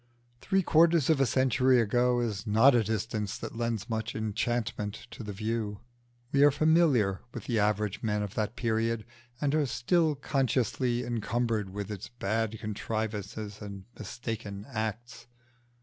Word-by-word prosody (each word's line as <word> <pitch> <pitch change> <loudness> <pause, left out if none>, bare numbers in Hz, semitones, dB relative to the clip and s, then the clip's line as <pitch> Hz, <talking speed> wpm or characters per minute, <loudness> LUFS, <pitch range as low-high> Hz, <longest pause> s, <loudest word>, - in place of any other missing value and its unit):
Three 195 +7 +1
quarters 165 -2 +4
of 145 -4 +2
a 135 - +4
century 130 +1 +3
ago 120 +2 +2
is 110 -2 -3
not 115 +6 +6
a 120 -2 +4
distance 110 -1 -2
that - - -7
lends 115 -2 -2
much 110 -1 -3
enchantment 110 -1 -2
to - - -8
the 105 -2 -5
view. 110 0 -3 0.5
We 140 0 +4
are 145 - +8
familiar 145 - +3
with - - -5
the 115 -3 0
average 105 -1 0
men 105 -2 0
of 100 - -5
that 110 +1 -2
period, 115 -1 0 0.3
and 145 -1 0
are 155 -2 +2
still 150 +7 +2
consciously 130 -2 0
encumbered 115 -2 -1
with 100 +2 -5
its 100 -3 -6
bad 110 -1 -2
contrivances 105 -1 -4
and 100 -2 -8
mistaken 105 -2 -6
acts. 115 +1 -4
115 Hz, 150 wpm, -29 LUFS, 105-125 Hz, 0.5 s, are